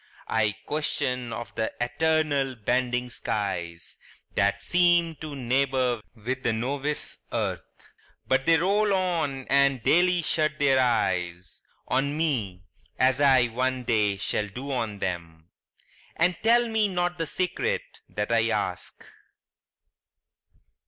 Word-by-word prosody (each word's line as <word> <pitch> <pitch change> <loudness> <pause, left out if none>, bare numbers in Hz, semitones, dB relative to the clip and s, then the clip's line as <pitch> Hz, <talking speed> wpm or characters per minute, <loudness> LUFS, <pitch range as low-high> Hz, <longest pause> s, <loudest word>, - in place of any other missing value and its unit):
I 105 -2 +1
question 125 -5 -1
of 115 -3 -6
th' 110 0 -1
eternal 140 +1 +1
bending 125 +2 -1
skies 85 -7 -4 0.4
That 100 0 +1
seem 175 - +3
to 155 -2 -7
neighbor 130 -2 0
with 125 +4 -4
the 120 - +1
novice 140 +6 -2
earth; - - -1 0.7
But 130 0 +1
they 165 0 +6
roll 200 +4 +2
on, 165 -8 -1
and 140 -3 +3
daily 175 +3 +3
shut 155 -1 0
their 135 -2 +3
eyes 90 -8 -1 0.3
On 140 +3 0
me, 110 - -1 0.3
as 130 +1 +3
I 135 -3 +5
one 130 +2 -1
day 105 -4 +1
shall 105 +1 -1
do 130 +7 -7
on 115 -5 -2
them, 85 -3 -5 0.6
And 175 +2 +2
tell 235 +2 +4
me 220 -2 +2
not 175 -2 -1
the 165 - -1
secret 455 - -2
that - - -3
I - - +3
ask. - - -3
130 Hz, 125 wpm, -26 LUFS, 115-160 Hz, 0.7 s, they